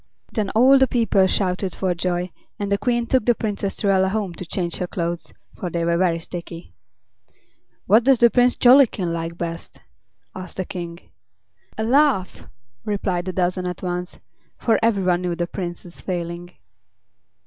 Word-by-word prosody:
Then 210 -4 -1
all 265 +4 +6
the 265 - +4
people 225 -6 +2
shouted 185 -1 -1
for 185 -2 0
joy 175 +1 -2 0.3
and 200 -1 -3
the 200 - +3
Queen 240 -1 0
took 255 0 +2
the 240 +1 +3
Princess 205 -3 -3
Truella 190 -2 +2
home 200 -3 -2
to 180 - -7
change 175 -1 -2
her 180 - -3
clothes, 170 -1 -4 0.2
for 180 - -5
they 170 0 -2
were 170 0 +2
very 170 -1 +2
sticky. 170 0 -8 1.1
"What 220 +5 +5
does 265 +1 +5
the 235 0 +5
Prince 245 0 +4
Jollikin 240 -9 +5
like 165 0 -4
best?" 165 -1 -6 0.5
asked 185 -1 -8
the 185 - -2
King. 170 -1 -7 0.8
"A 220 - -1
laugh!" 260 -5 +2 0.4
replied 190 -3 -2
a - - -1
dozen 180 0 -1
at 180 0 -6
once, 180 0 -4 0.4
for 225 - +2
every 225 -4 +2
one 180 -1 +2
knew 175 -1 -2
the 175 0 -1
Prince's 175 -1 -7
failing. 175 -1 -4
185 Hz, 165 wpm, -22 LUFS, 175-220 Hz, 1.1 s, all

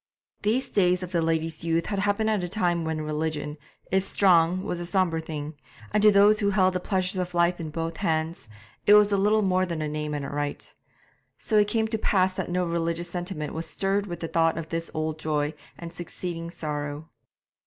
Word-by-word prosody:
These 230 +6 0
days 180 -2 +2
of 180 - -6
the 170 -2 +1
lady's 160 -1 -1
youth 165 0 +1
had 200 -2 -2
happened 205 +2 +1
at 205 -4 0
a 175 - -3
time 175 -4 0
when 160 -1 -2
religion, 150 -1 -3 0.3
if 190 0 +3
strong, 185 -2 +3
was 175 - -3
a 175 - -4
sombre 180 -3 +1
thing; 155 -1 -5 0.4
and 210 - +3
to 210 0 +7
those 205 +2 +5
who 200 -2 +2
held 190 -2 +3
the 180 - 0
pleasures 185 0 -1
of 180 -1 -5
life 175 +1 +2
in 160 -2 -4
both 165 +1 -4
hands, 160 -5 -2 0.4
it 205 - +9
was 210 0 +6
little 210 +2 +3
more 185 -1 +2
than 170 -3 -3
a 155 - -2
name 150 0 -3
and 145 -1 -3
a - - -5
rite. 145 0 -4 0.6
So 220 - -2
it 205 -1 +5
came 220 +1 +1
to 220 -1 -2
pass 185 -3 +2
that - - -4
no 180 0 0
religious 170 0 -2
sentiment 175 -4 -4
was 160 +1 -5
stirred 200 +1 0
with 175 -2 -6
the 165 - -2
thought 165 0 +2
of 165 -1 -5
this 165 0 -3
old 155 0 -2
joy 150 -1 -1 0.2
and 170 0 -8
succeeding 170 -1 -6
sorrow. 150 -2 -5
170 Hz, 210 wpm, -26 LUFS, 160-190 Hz, 0.6 s, it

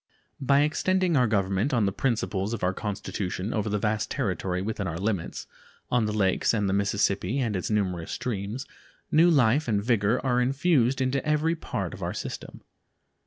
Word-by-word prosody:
By 140 +1 +4
extending 180 +3 +1
our 125 -3 +4
Government 100 +5 +1
on 115 -4 +3
the 100 - +1
principles 110 -3 -1
of 110 - -8
our 90 +1 +2
Constitution 100 -1 -4
over 110 -1 -1
the 105 - 0
vast 105 +1 -1
territory 95 - -2
within 100 0 -3
our 85 -1 -3
limits, 100 -2 -2 0.5
on 120 -3 +2
the - - -1
Lakes 100 +1 +2
and 105 -2 0
the 95 - 0
Mississippi 100 +2 +1
and 115 -6 0
its 90 - -2
numerous 95 -6 -1
streams, 110 +3 -4 0.5
new 165 +3 +6
life 140 -1 +3
and 105 -3 +1
vigor 115 0 +2
are 125 -1 +2
infused 135 -1 +2
into 130 +1 0
every 155 +2 +1
part 165 - -4
of - - -9
our - - -3
system. - - -6
110 Hz, 175 wpm, -27 LUFS, 100-135 Hz, 0.5 s, new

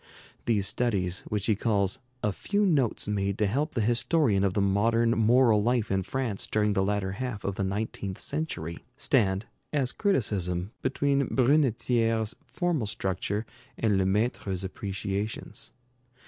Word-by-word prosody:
These 105 -4 +2
studies, 95 -6 0
which 105 -1 -2
he 110 - +3
calls 100 -3 +1 0.2
"a 105 - +2
few 205 - 0
notes 140 - +1
made 100 -1 -1
to 105 - +2
help 140 +10 -1
the 115 - +1
historian 120 - +2
of 95 -2 +1
the - - +2
modern 115 +4 +3
moral 115 -1 +4
life 120 -1 +1
in 95 0 +2
France 115 0 -3
during 105 -1 +1
the 95 - +2
latter 100 -1 0
half 115 0 -4
of 100 - -1
the 100 - -2
nineteenth 100 -1 -3
century," 85 - -3 0.2
stand, 110 -8 +1 0.3
as 135 -4 +1
criticism, 100 - 0
between 140 +1 +1
Brunetière's 120 -4 +2
formal 170 - -1
structure 100 0 -2 0.3
and 105 -4 +2
Lemaître's 95 -1 0
appreciations. 100 +2 -4
105 Hz, 140 wpm, -28 LUFS, 100-125 Hz, 0.3 s, moral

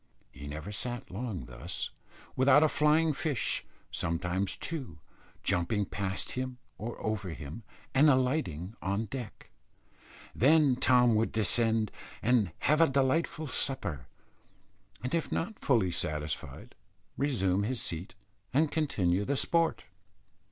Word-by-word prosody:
He 70 +2 -9
never 75 +7 -6
sat 120 +3 -4
long 105 -2 -4
thus - - -5 0.4
without 135 +3 +6
a - - +6
flying 150 +1 +3
fish, 140 -3 -1 0.3
sometimes 90 +3 -1
two, 135 - -4 0.5
jumping 100 +3 +1
past 95 0 -2
him 130 0 -3 0.2
or 115 +3 -5
over 105 -3 -1
him, 80 +7 -8 0.3
and 145 +3 +6
alighting 125 - +1
on 100 +3 -1
deck. 120 0 -8 0.8
Then 145 +1 +5
Tom 125 -2 +4
would 110 +1 +2
descend, 110 0 +2 0.3
and 115 -6 +3
have 155 +2 +3
a 165 - +6
delightful 140 +4 +1
supper, 105 - -2 1.0
and 125 - -3
if 165 -2 0
not 200 +6 -2
fully 115 - +2
satisfied 75 -4 -3 0.4
resume 100 -9 +1
his 120 +4 -1
seat 90 0 -3 0.4
and 150 +4 +2
continue 100 - +1
the 140 +6 0
sport. 165 +3 +1
115 Hz, 125 wpm, -30 LUFS, 95-140 Hz, 1.0 s, without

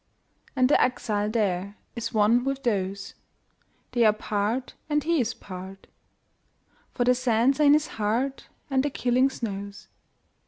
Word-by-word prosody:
And 255 -1 +4
the 290 - +4
exile 210 -4 0
thereIs 205 +1 -3
one 220 +3 +3
with 275 0 -3
those; 195 -4 -2 0.8
They 240 -1 +2
are 215 - +6
part, 215 +4 -2 0.2
and 295 -1 +1
he 330 -3 +2
is 225 - -2
part, 190 0 -10 1.1
For 245 - -1
the 250 +1 +4
sands 250 +2 +2
are - - +4
in 285 - +7
his 300 0 +3 0.2
heart, 245 +6 -1 0.2
And 265 -1 +3
the 290 - -1
killing 255 0 +2
snows. 200 -5 -6
235 Hz, 145 wpm, -26 LUFS, 205-265 Hz, 1.1 s, in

